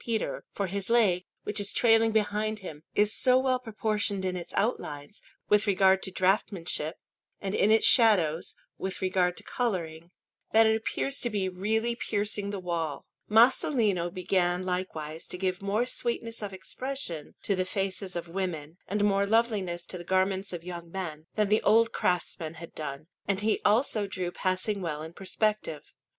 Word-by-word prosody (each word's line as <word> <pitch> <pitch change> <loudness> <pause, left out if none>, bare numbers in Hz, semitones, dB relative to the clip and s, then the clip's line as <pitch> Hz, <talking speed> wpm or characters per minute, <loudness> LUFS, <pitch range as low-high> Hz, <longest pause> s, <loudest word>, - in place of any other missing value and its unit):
Peter; 230 -2 -2
for 200 - -2
his 195 +2 -3
leg, 200 -7 +3 0.2
which 210 - -2
is 205 0 0
trailing 225 -1 +4
behind 215 0 0
him, 160 -7 -9
is 210 +1 +4
so 255 0 +4
well 260 -1 +2
proportioned 215 -4 -1
in 185 0 -1
its 175 -1 -6
outlines, 150 -6 -2 0.3
with 210 0 +3
regard 190 -1 +4
to - - -2
draughtsmanship, 185 -4 0 0.4
and 195 -1 -3
in 205 - +3
its 220 0 +5
shadows, 180 - +4 0.2
with 190 0 -4
regard 185 -1 +1
to - - -6
colouring, 170 -8 -3 0.4
that 225 0 +7
it 220 0 +4
appears 275 +5 -1
to 240 - +2
be 200 -4 -1
really 220 +6 0
piercing 205 -3 -1
the 200 -1 -4
wall. 170 -4 -3 0.2
Masolino 220 - +4
began 180 -1 0
likewise 165 -4 -4
to - - -5
give 185 0 -1
more 205 +4 +1
sweetness 235 -2 -2
of 205 -2 -4
expression 190 - -5
to 200 - +1
the 185 - +1
faces 190 0 -3
of 170 0 -4
women, 170 -3 -4
and 205 +1 0
more 200 -1 +3
loveliness 200 -6 +1
to 180 - -7
the - - -7
garments 190 +2 +1
of 175 -2 -6
young 170 -1 -7
men, 165 -4 -6
than 210 -1 +2
the 215 +2 +3
old 225 +1 +4
craftsmen 170 -2 -1
had 170 +1 -10
done; 145 -1 -6 0.2
and 200 -1 0
he 215 0 +1
also 215 -1 +2
drew 185 -2 -3
passing 185 +3 -1
well 155 -3 -3
in 160 +1 -8
perspective. 195 -5 -2
195 Hz, 170 wpm, -28 LUFS, 175-215 Hz, 0.4 s, that